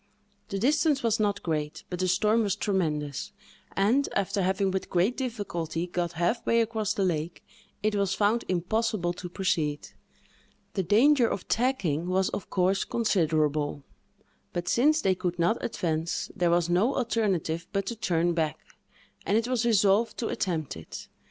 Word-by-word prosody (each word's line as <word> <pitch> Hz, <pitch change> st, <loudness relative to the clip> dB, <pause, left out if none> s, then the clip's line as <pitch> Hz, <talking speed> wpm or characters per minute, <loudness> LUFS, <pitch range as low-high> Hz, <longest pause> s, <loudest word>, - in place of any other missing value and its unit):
The 195 Hz, -, -2 dB
distance 290 Hz, +4 st, +2 dB
was 230 Hz, -1 st, +2 dB
not 205 Hz, -1 st, 0 dB
great, 150 Hz, -2 st, -3 dB
but 180 Hz, -, -3 dB
the 185 Hz, -, +1 dB
storm 210 Hz, +5 st, +3 dB
was 205 Hz, -4 st, 0 dB
tremendous; 150 Hz, -8 st, -2 dB, 0.5 s
and, 230 Hz, +9 st, +3 dB
after 200 Hz, +1 st, 0 dB
having 190 Hz, +1 st, +1 dB
with 190 Hz, 0 st, -3 dB
great 185 Hz, +8 st, +2 dB
difficulty 185 Hz, -, -3 dB
got 175 Hz, -1 st, -2 dB
half 175 Hz, +8 st, 0 dB
way 230 Hz, -, +3 dB
across 220 Hz, -2 st, -1 dB
the 195 Hz, -, +1 dB
lake, 165 Hz, -1 st, -2 dB, 0.4 s
it 215 Hz, 0 st, +2 dB
was 200 Hz, -2 st, 0 dB
found 215 Hz, +3 st, +2 dB
impossible 185 Hz, 0 st, 0 dB
to 180 Hz, 0 st, -7 dB
proceed. 160 Hz, -6 st, -1 dB, 0.8 s
The 195 Hz, -, 0 dB
danger 235 Hz, -, +4 dB
of 200 Hz, -, -4 dB
tacking 195 Hz, -, 0 dB
was, 185 Hz, +1 st, +1 dB
of 200 Hz, -, -5 dB
course, 185 Hz, +1 st, +1 dB
considerable; 155 Hz, -9 st, 0 dB, 0.7 s
but, 175 Hz, 0 st, -3 dB
since 305 Hz, -, +3 dB
they 190 Hz, -, +3 dB
could 180 Hz, -1 st, -3 dB
not 175 Hz, +7 st, +1 dB
advance, 165 Hz, -5 st, -2 dB
there 175 Hz, -1 st, +2 dB
was 170 Hz, 0 st, +2 dB
no 190 Hz, +10 st, +2 dB
alternative 205 Hz, -, -1 dB
but 195 Hz, -2 st, -1 dB
to 235 Hz, -, -3 dB
turn 175 Hz, -5 st, +1 dB
back, 160 Hz, -3 st, -1 dB, 0.7 s
and 205 Hz, -, +2 dB
it 230 Hz, +1 st, 0 dB
was 250 Hz, -2 st, 0 dB
resolved 210 Hz, 0 st, +3 dB
to 230 Hz, -, -2 dB
attempt 165 Hz, -6 st, -2 dB
it. 80 Hz, -1 st, -9 dB
190 Hz, 160 wpm, -27 LUFS, 170-220 Hz, 0.8 s, danger